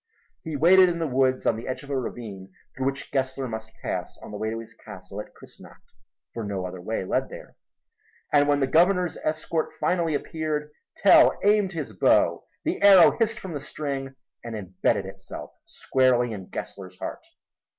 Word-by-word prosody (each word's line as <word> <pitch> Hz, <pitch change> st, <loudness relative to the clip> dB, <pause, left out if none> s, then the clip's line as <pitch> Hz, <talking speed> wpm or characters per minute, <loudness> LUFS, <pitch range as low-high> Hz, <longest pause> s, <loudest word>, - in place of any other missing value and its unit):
He 160 Hz, -2 st, -5 dB
waited 180 Hz, +5 st, +6 dB
in 170 Hz, -, -2 dB
the 165 Hz, -, -1 dB
woods 130 Hz, -2 st, +1 dB
on -, -, +3 dB
the 115 Hz, -, -7 dB
edge 130 Hz, +2 st, -4 dB
of 140 Hz, -, -9 dB
a -, -, 0 dB
ravine 105 Hz, -7 st, -6 dB, 0.2 s
through 130 Hz, +1 st, -1 dB
which 135 Hz, 0 st, -4 dB
Gessler 130 Hz, -1 st, -1 dB
must 110 Hz, -1 st, -6 dB
pass -, -, -4 dB
on -, -, -9 dB
the 105 Hz, -, -6 dB
way 110 Hz, +1 st, -2 dB
to 115 Hz, -, -3 dB
his 115 Hz, -1 st, -9 dB
castle -, -, -9 dB
at -, -, -14 dB
Kussnacht, -, -, -17 dB, 0.4 s
for 115 Hz, -, -4 dB
no 100 Hz, -3 st, -3 dB
other 90 Hz, 0 st, -7 dB
way 110 Hz, 0 st, -3 dB
led -, -, -1 dB
there; -, -, -11 dB, 0.8 s
and 145 Hz, -1 st, +5 dB
when 145 Hz, -1 st, +2 dB
the -, -, +4 dB
Governor's 180 Hz, +4 st, +3 dB
escort 155 Hz, +1 st, -2 dB
finally 170 Hz, -4 st, +1 dB
appeared, 150 Hz, 0 st, -3 dB, 0.3 s
Tell 200 Hz, -, +6 dB
aimed 205 Hz, -2 st, +3 dB
his 145 Hz, -9 st, -5 dB
bow, 95 Hz, -, +3 dB, 0.2 s
the -, -, -2 dB
arrow 195 Hz, -3 st, +8 dB
hissed 230 Hz, 0 st, +1 dB
from 185 Hz, -3 st, -7 dB
the 145 Hz, -, -3 dB
string 135 Hz, -2 st, -5 dB, 0.3 s
and 115 Hz, -1 st, -6 dB
imbedded 95 Hz, -1 st, -1 dB
itself 95 Hz, 0 st, -9 dB, 0.2 s
squarely 125 Hz, -3 st, +1 dB
in 95 Hz, -3 st, -8 dB
Gessler's 95 Hz, -2 st, -8 dB
heart. -, -, -6 dB
135 Hz, 180 wpm, -25 LUFS, 110-160 Hz, 0.8 s, arrow